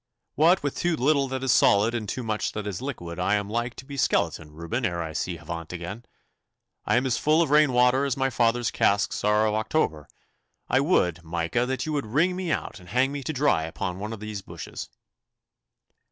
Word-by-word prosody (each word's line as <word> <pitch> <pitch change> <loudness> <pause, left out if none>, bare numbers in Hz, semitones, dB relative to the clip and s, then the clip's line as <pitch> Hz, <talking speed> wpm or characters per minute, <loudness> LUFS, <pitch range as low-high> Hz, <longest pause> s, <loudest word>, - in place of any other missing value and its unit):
'What 170 +3 +4
with 145 - -2
too 175 -1 +1
little 140 +1 +2
that 130 0 -4
is 130 - +2
solid 105 +2 +4
and 110 -4 -3
too 130 - -3
much 110 -1 -2
that 105 -1 -4
is 100 -3 -4
liquid 90 -11 -5
I 95 +3 +2
am 100 -1 -1
like 120 +3 -2
to 130 - -10
be 140 0 -8
skeleton 80 - 0
Reuben 85 +11 -4
ere 85 -4 -1
I 80 -1 -6
see 85 +2 -3
Havant 85 0 -7
again. 90 +7 -6 0.8
I - - +3
am 125 - +1
as 130 - 0
full 155 +2 +4
of 150 - -3
rain 150 -2 +5
water 125 +2 +4
as 140 -2 -1
my 135 0 +1
father's 120 0 +1
casks 100 +1 +1
are 105 +1 +3
of 105 - +1
October. 110 - -1 0.6
I 130 - +3
would, 90 - +1
Micah, 85 +8 -1
that 130 0 -2
you 155 - -3
would 140 -6 -2
wring 165 +11 +2
me 180 -3 -2
out 115 - -3
and 90 -1 -15
hang 130 +5 +2
me 145 0 -4
to 145 - -3
dry 135 - +2
upon 90 +3 -4
one 105 +2 -4
of 115 - -6
these 105 -1 -5
bushes. - - -8
115 Hz, 215 wpm, -26 LUFS, 95-135 Hz, 0.8 s, rain